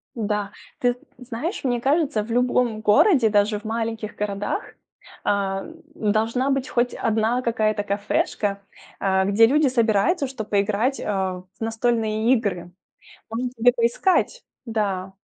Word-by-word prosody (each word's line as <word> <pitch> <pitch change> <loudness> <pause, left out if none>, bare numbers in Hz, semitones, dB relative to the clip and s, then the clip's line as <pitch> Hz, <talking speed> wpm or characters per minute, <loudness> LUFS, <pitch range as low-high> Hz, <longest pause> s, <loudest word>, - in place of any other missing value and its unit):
Да, 210 -3 -2 0.3
ты 245 -1 +2 0.2
з 250 - -12
знаешь, 270 - -4
мне 245 -2 0
кажется, 285 -3 +1
в 225 - -11
любом 245 -2 +1
городе, 225 - +5
даже 205 +1 +2
в - - -23
маленьких 225 -1 -3
городах, 205 - -3 0.5
а, 195 -1 0
м, 325 - -11 0.4
должна 230 +5 0
быть 270 -1 0
хоть 245 0 0
1 225 +3 0
какая-то 215 -3 0
кафешка, 200 0 -1 0.4
а, 190 -1 +2
где 200 +4 +5
люди 290 +4 +3
собираются, 240 - +2
чтоб 240 -5 -7
поиграть, 210 +6 +1
а, 190 -3 -2 0.2
в - - -44
настольные 225 0 +1
игры. 190 -8 -1 0.6
Может, 245 +2 -3
тебе 245 +1 +4
поискать? 355 - +1 0.2
Да. 195 -5 -2
225 Hz, 135 wpm, -23 LUFS, 205-250 Hz, 0.6 s, городе